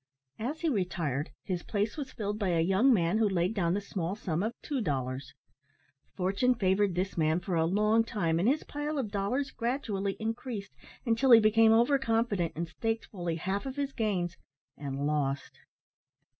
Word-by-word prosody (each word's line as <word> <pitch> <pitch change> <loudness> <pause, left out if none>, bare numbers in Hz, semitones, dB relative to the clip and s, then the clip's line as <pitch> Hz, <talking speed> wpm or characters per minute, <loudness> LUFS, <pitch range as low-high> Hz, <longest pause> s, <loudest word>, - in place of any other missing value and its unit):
As 275 +8 -3
he 335 - 0
retired 170 - -1
his 180 -2 -2
place 210 +2 -1
was 275 -4 -5
filled 210 -2 -3
by 200 - 0
a 170 -2 +2
young 195 +10 +4
man 180 -1 +2
who 215 -2 +3
laid 180 +1 +1
down 175 -4 +1
the 205 - -1
small 190 -2 -3
sum 175 -5 -2
of 225 +3 -3
two 280 -4 -2
dollars. 130 - -3 0.8
Fortune 195 +7 +2
favoured 190 -2 +2
this 185 0 -2
man 160 +1 +2
for 180 +1 -4
a 165 -1 +2
long 210 +5 +3
time, 170 -8 0
and 185 - +2
his 295 +3 +1
pile 295 +1 -4
of 235 -7 -2
dollars 240 +8 -1
gradually 220 -6 -2
increased 225 - -4 0.3
until 230 +3 +2
he 230 -2 +10
became 220 +1 +5
over 240 +5 +4
confident 225 -8 0
and 170 +2 -3
staked 225 +7 -2
fully 175 -4 -3
half 190 - -2
of 265 - -5
his 280 -1 -2
gains 185 -6 -1 0.4
and 140 -1 -4
lost. 145 -2 -1
200 Hz, 180 wpm, -30 LUFS, 175-230 Hz, 0.8 s, he